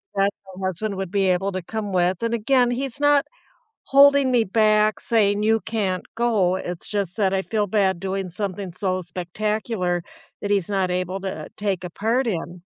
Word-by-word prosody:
my 195 0 +3 0.4
husband 200 +3 -3
would 190 -2 -3
be 195 -2 +2
able 190 +2 +1
to 185 - -3
come 210 +3 -4
with. 180 +1 +1
And 230 0 0
again, 245 +2 +3
he's 265 +2 -3
not 290 -1 +4 0.6
holding 280 -1 +6
me 240 -2 +4
back 215 +1 +3
saying, 205 -3 +2
"You 225 +1 +3
can't 200 -5 -2
go." 215 -6 +2
It's 175 -2 -5
just 200 -3 -3
that 195 -3 +2
I 190 - +1
feel 210 +1 -1
bad 190 -3 +1
doing 195 0 -3
something 190 0 -4
so 185 -1 -1
spectacular 180 +1 -2 0.4
that 205 - -1
he's 200 -3 +1
not 190 -3 0
able 185 +1 -2
to, 190 -1 -4
uh, - - -10
take 195 -3 -1
a 180 - -5
part 230 +8 0
in. 175 -2 -4
200 Hz, 185 wpm, -23 LUFS, 185-220 Hz, 0.6 s, holding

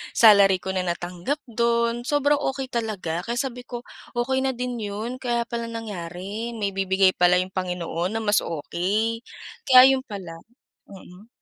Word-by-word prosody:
salary 200 -4 +6
ko 190 - -2
na 185 -1 -2
natanggap 175 - -3
do'n, 235 0 0
sobrang 290 0 +2
okey 270 -2 -3
talaga. 210 -8 -2
Kaya 235 - -1
sabi 250 -1 -4
ko, 240 0 -6 0.3
okey 255 +2 0
na 265 -1 -1
din 250 0 -4
'yon. 215 +4 -4
Kaya 240 -2 0
pala 235 0 -4
nangyari, 210 0 -6
may 205 -3 -2
ibibigay 190 0 +3
pala 180 0 +4
yung 185 +1 0
Panginoon 180 +1 -3
na 225 - -2
mas 205 0 +3
okey. 195 +8 -2 0.5
Kaya 260 0 +9
'yon 265 -1 -1
pala. 180 -6 -8 0.5
Mm. 195 +1 -14
220 Hz, 160 wpm, -24 LUFS, 185-240 Hz, 0.5 s, Kaya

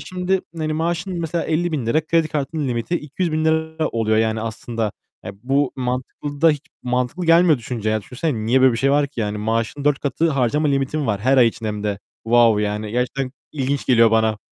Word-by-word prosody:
şimdi 185 +1 -1 0.2
hani 155 -1 -2
maaşın 170 +3 -2
mesela 165 +1 -2
₺50.000, 155 -3 0
kredi 165 -1 +2
kartının 145 0 -2
limiti 120 +7 -2
₺200.000 160 0 -1
oluyor, 110 -1 0
yani, 110 0 +1
aslında. 115 -1 -3 0.3
E, - - -6
bu 135 +1 +1
mantıklı 130 +3 -4
da 165 0 +6
hiç 145 -2 -3 0.2
mantıklı 125 +8 -1
gelmiyor 165 -2 +5
düşününce 115 -2 -3
ya. 110 0 0
Düşünsene, 125 -2 -3
niye 130 +3 +3
böyle 130 -1 +6
bir 115 - -2
şey 135 - +2
var 145 0 +3
ki? 135 -4 -7
Yani 105 0 -2
maaşının 115 +6 -2
4 145 -1 +3
katı 160 +3 0
harcama 140 +2 +1
limitin 140 +1 0
var 100 -2 -1
her 130 +4 +3
ay 125 -2 +6
için 110 0 -7
hem 105 -1 -3
de. 105 -2 -2 0.3
Vaov, 115 -2 +5
yani, 105 0 -2
gerçekten 125 +2 -2 0.2
ilginç 140 -1 -2
geliyor 115 -3 +5
bana. 110 -1 +2
135 Hz, 190 wpm, -21 LUFS, 115-155 Hz, 0.3 s, da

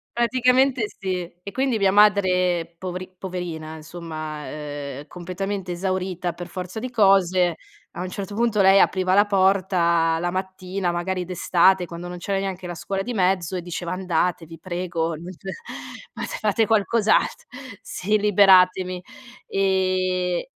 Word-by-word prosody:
Praticamente 250 0 +3
sì. 180 -3 -3
E 200 - -7
quindi, 260 0 0
mia 195 -2 +3
madre 185 -4 +3
povri 185 0 -5
poverina 170 -4 -5
insomma, 155 -2 -7
ehm, 145 -1 -6
completamente 185 +1 -5
esaurita 185 -1 -2
per 175 +1 -8
forza 185 +3 -6
di 255 - -4
cose, 190 -6 +3 0.4
a 175 - -7
un 185 - -4
certo 200 +2 -6
punto 220 -1 +1
lei 195 +1 +7
apriva 185 -1 +2
la 205 +2 +6
porta 185 -4 +2
la 175 +1 -1
mattina, 185 0 -3
magari 180 +1 -2
d'estate, 180 +1 +3
quando 170 +1 -8
non 180 0 -7
c'era 195 +2 -2
neanche 190 -2 -4
la 175 - -5
scuola 195 +3 -3
di 245 - -4
mezzo 185 -3 +1
e 180 - -2
diceva: 175 0 -5
"Andate, 180 -2 -1
vi 165 0 -11
prego, 175 -2 -2
non 170 +4 -9
c 180 - -14 0.8
fate - - -5
fate 215 +1 +2
qualcos 220 0 +1
alt" - - +2 0.4
sì! 210 +3 -1
"Liberatemi." 185 -3 +4 0.5
Ehm, 185 -2 +1
185 Hz, 145 wpm, -23 LUFS, 175-195 Hz, 0.8 s, lei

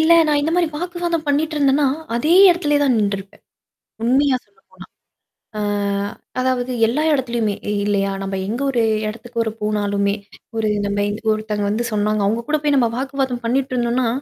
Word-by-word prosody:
இல்ல 320 +1 +5
நான் 300 -1 +2
இந்த 300 +3 0
மாரி 350 -1 +3
வாக்குவாதம் 345 -1 -2
பண்ணிட்டு 305 +2 0
இருந்தேன்னா, 280 0 +3 0.3
அதே 300 +8 +1 0.2
இடத்திலேயே 295 -5 +1
தான் 270 -3 +3
நின்றுருப்பேன். 200 -1 -3 0.6
உண்மையா 265 +3 +3
சொல்ல 450 - -32
போனா. - - -14 0.8
ஆ - - -1 0.8
அதாவது 255 -1 0 0.2
எல்லா 290 +7 0
இடத்துலயுமே 235 -6 0 0.3
இல்லையா? 200 -1 +1
நம்ம 195 0 -3
எங்க 235 +6 -3
ஒரு 240 -3 +1 0.3
இடத்துக்கு 230 +2 -4
ஒரு 220 - -1
போனாலுமே, 205 -1 0 0.4
ஒரு 220 -1 +1 0.2
நம்ம 205 0 0 0.3
ஒருத்தங்க 215 -1 -2
வந்து 220 +4 -1
சொன்னாங்க. 210 0 +1
அவங்க 225 +3 -1
கூட 305 0 +2
போய் 295 -1 +2
நம்ம 240 -3 +3
வாக்குவாதம் 265 -2 -2
பண்ணிட்டு 260 +2 0
இருந்தோம்னா, 240 0 +1
245 Hz, 155 wpm, -20 LUFS, 215-290 Hz, 0.8 s, இல்ல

